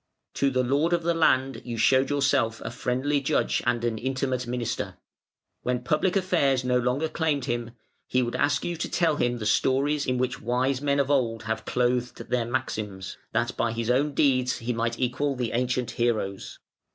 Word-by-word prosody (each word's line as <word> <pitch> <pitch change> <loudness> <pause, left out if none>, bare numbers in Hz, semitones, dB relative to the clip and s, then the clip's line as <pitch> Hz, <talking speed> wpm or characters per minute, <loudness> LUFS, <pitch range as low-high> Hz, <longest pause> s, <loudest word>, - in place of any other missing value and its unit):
"To 140 - +2
the 130 -1 +1
lord 145 +7 +1
of 170 -1 +1
the 170 +1 +2
land 135 -5 +2
you 120 -2 -5
showed 130 +4 +4
yourself 135 -5 +1
a - - -5
friendly 130 +4 0
judge 145 +3 +1
and 120 -1 +1
an 115 -2 -1
intimate 130 0 -2
minister. 120 -1 -3 0.6
When 125 0 -1
public 155 +9 +1
affairs 165 -9 +2
no 125 0 +2
longer 125 +6 0
claimed 155 -4 -1
him, 120 -2 -3 0.3
he 130 0 +2
would 120 - -3
ask 145 0 +1
you 175 - -2
to 170 - -3
tell 165 -4 +1
him 120 -2 +1
the 110 - -5
stories 140 +6 +2
in 125 0 +1
which 125 0 -1
wise 125 +3 0
men 140 -1 +1
of 140 0 +1
old 115 -5 +1
have 110 +1 -3
clothed 125 0 -1
their 125 -2 +1
maxims, 110 -6 -4
that - - 0
by 115 -1 0
his 115 +1 -1
own 140 +3 +1
deeds 130 -3 +2
he 120 +2 -3
might 115 0 -1
equal 130 +3 0
the 125 -3 -2
ancient 125 0 0
heroes. 110 -5 -2
125 Hz, 190 wpm, -26 LUFS, 120-140 Hz, 0.6 s, showed